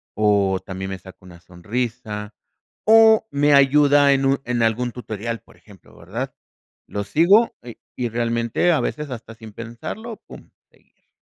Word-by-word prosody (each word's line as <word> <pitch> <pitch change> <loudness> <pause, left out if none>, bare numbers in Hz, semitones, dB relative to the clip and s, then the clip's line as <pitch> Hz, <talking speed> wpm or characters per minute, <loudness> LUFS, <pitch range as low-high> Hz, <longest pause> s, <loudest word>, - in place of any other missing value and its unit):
o 100 -2 +2
también 95 0 -6
me 95 - -6
saca 95 0 -14
una 90 -2 -14
sonrisa, 105 +4 -5 0.5
o 220 0 +6
me 145 +1 +2
ayuda 140 +1 +5
en 135 - 0
un 135 0 +2
en 120 -1 -1
algún 115 +2 0
tutorial, 115 -1 -5
por - - -21
ejemplo, 100 -3 -19
¿verdad? 115 +10 -6 0.5
Lo 100 0 -4
sigo 175 - +4
y 120 -1 -10 0.2
y 125 -1 -2
realmente 115 +7 0
a 160 - +2
veces 150 -1 -4
hasta 115 -2 -8
sin 110 -2 -12
pensarlo, 120 - -7
pum, - - -13 0.2
seguir. - - -33
115 Hz, 155 wpm, -21 LUFS, 105-140 Hz, 0.5 s, o